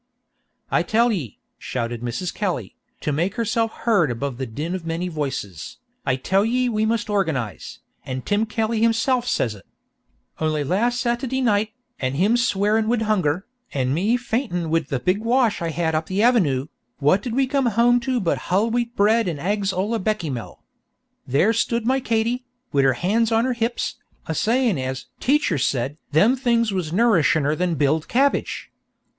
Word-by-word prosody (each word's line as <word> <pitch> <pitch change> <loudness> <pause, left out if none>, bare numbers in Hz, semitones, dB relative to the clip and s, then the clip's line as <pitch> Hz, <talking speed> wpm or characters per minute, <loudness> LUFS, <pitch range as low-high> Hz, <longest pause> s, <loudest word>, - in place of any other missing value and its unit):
"I - - +3
tell 235 +2 +2
ye," 155 - -4 0.2
shouted 120 -2 -4
Mrs. 125 +10 -3
Kelly, 175 - -3 0.3
to 150 - -1
make 170 +7 -1
herself 230 -1 0
heard 205 - +2
above 125 +1 -3
the 130 - -3
din 150 +10 -4
of 185 -2 -4
many 165 +2 -2
voices, 135 - -5 0.3
"I 130 - +3
tell 190 +9 +1
ye 250 +3 +1
we 215 -1 +1
must 230 0 0
organize, 160 - -2 0.3
an' 130 -1 -5
Tim 210 +2 0
Kelly 220 0 -1
himself 235 +2 +2
says 115 - 0
it. 100 - -14 0.8
Only 155 -2 0
last 230 - +1
Satady 245 +2 -1
night, 215 -1 +1 0.3
an' 130 0 -1
him 200 +9 +3
swearin' 215 -2 +2
wid 230 -1 +1
hunger, 190 -4 0 0.3
an' 130 -1 +1
me 205 +10 +2
faintin' 225 - -2
wid 165 -1 +1
the 135 - -2
big 180 +10 +1
wash 230 -2 +2
I 170 - -1
had 160 0 -1
up 155 +1 -1
the 195 +3 0
Avenoo, 155 - +3 0.3
what 150 +7 +3
did 235 +1 -4
we 270 0 +3
come 270 -1 +1
home 240 +2 +4
to 260 0 -1
but 180 -6 0
hull 205 +6 +2
wheat 240 0 -1
bred 220 +1 +3
an' 160 - -3
ags 195 +5 0
olla 205 +5 -1
Beckymell. 170 - -3 0.6
There 145 - +3
stood 230 0 0
my 260 +2 +2
Katy, 235 0 0 0.3
wid 140 -1 +3
her 135 - +4
han's 215 - +1
on 225 +1 +3
her 255 - +1
hips, 235 0 -2 0.3
a 160 - -3
sayin' 225 - +1
as 130 0 -4
'teacher 265 - +2
said' 130 +2 -1
them 205 - +4
things 235 -4 +1
was 180 -5 -2
nourishiner 160 -8 +3
than 175 0 0
b'iled 150 +2 +1
cabbage. 275 +3 0
200 Hz, 175 wpm, -22 LUFS, 155-230 Hz, 0.8 s, home